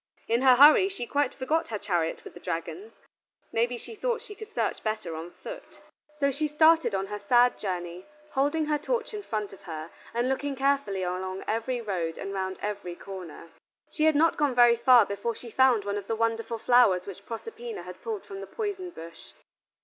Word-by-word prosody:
In 230 +2 +2
her 260 -1 +7
hurry 300 +8 +8
she 385 -11 -5
quite 285 +1 0
forgot 310 +5 -1
her 220 - -3
chariot 175 -5 -1
with - - -10
the - - -11
dragons; 180 - -5 0.6
may 230 +1 +2
be 245 0 -5
she 345 - -10
thought 475 +2 -2
she 415 - -10
could 435 +1 -11
search - - -1
better 215 -7 -3
on 165 +2 -6
foot. - - -10 0.4
So 280 -1 +2
she 300 +3 -1
started 315 -3 +4
on 190 0 -1
her 210 +1 -6
sad 240 +4 +4
journey, 180 -2 -4 0.2
holding 290 +4 +1
her 300 0 0
torch 470 +9 -2
in 420 - -4
front 215 - -4
of 195 - -13
her, 160 -1 -6 0.2
and 240 +2 0
looking 275 +1 -1
carefully 270 -8 0
along 185 +1 -3
every 235 +2 -1
road 175 -7 -3
and 195 0 -5
round 190 -1 -3
every 200 -4 -4
corner. 180 -4 -9 0.4
She 310 - +1
had 315 -1 +4
not 325 +3 +3
gone 290 -4 +1
very 240 -1 +7
far 240 -1 +6
before 200 +4 -3
she 235 - -10
found 255 -5 +4
one 205 0 -1
of 200 - -11
the 225 - -1
wonderful 230 +1 -1
flowers 225 -6 +4
which 195 -3 -9
Proserpina 450 - -6
had - - -10
pulled 435 -3 -5
from 390 -1 -8
the - - -7
poison 400 -5 -4
bush. 165 - -12
235 Hz, 205 wpm, -27 LUFS, 195-300 Hz, 0.6 s, hurry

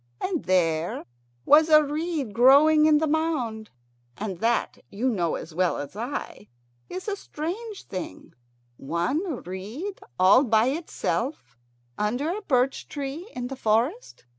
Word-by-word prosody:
And 360 -5 -2
there 170 -3 +1 0.4
was 310 +2 +6
a 305 -1 +7
reed 300 -5 -3
growing 290 +6 +6
in 305 -1 +5
the 315 - +1
mound, 290 -9 -1 0.5
and 195 -4 -5
that, 230 +2 0
you 225 +6 -2
know 175 -8 0
as 160 - -8
well 180 +2 +1
as 145 +5 -7
I, 220 - -6 0.4
is 370 +2 -6
a 410 - -1
strange 395 +5 -6
thing, 180 - -7 0.4
one 235 - -2
reed 215 - -6 0.2
all 195 +8 +6
by 225 -1 +3
itself 270 - -3 0.4
under 250 - -1
a 425 - -5
birch 260 -7 0
tree 290 +7 -6
in 245 - -3
the 270 +2 -5
forest. 250 - -1
260 Hz, 140 wpm, -25 LUFS, 205-315 Hz, 0.5 s, a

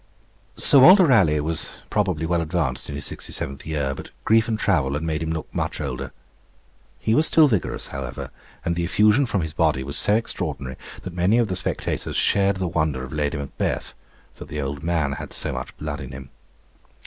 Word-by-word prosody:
Sir 140 - +8
Walter 185 +7 +8
Raleigh 95 - +4
was 80 +2 -1 0.2
probably 80 +2 0
well 85 0 +1
advanced 80 -7 -2
in 70 - -5
his 70 - -2
sixty - - -3
seventh 70 +2 -4
year, 70 -4 -1
but - - -9 0.2
grief 110 0 +4
and 110 -2 -1
travel 70 -11 +1
had 75 - -3
made 80 -1 -2
him 80 - -2
look 80 -1 -5
much - - -2
older. - - -4 0.9
He 110 - 0
was 155 +7 +4
still 160 -2 +6
vigorous, 110 -9 -1
however, 70 -2 -6 0.3
and 85 - 0
the 85 - -1
effusion 105 +9 +3
from 100 -5 0
his 80 -2 -4
body 65 - +1
was 70 +2 0
so 105 - +3
extraordinary, 75 - -3 0.3
that 90 - -7
many 90 +6 +2
of 115 -3 +2
the 95 - -1
spectators - - -3
shared 100 0 +2
the 95 -1 -2
wonder 75 -6 -1
of 65 - -8
Lady 75 -1 -1
Macbeth, 70 -1 -3 0.4
that - - -9
the 75 - -5
old 70 0 -4
man 80 -4 0
had - - -6
so - - -2
much - - -6
blood 75 -2 -5
in 65 -1 -8
him. 65 0 -10
80 Hz, 200 wpm, -23 LUFS, 70-100 Hz, 0.9 s, Sir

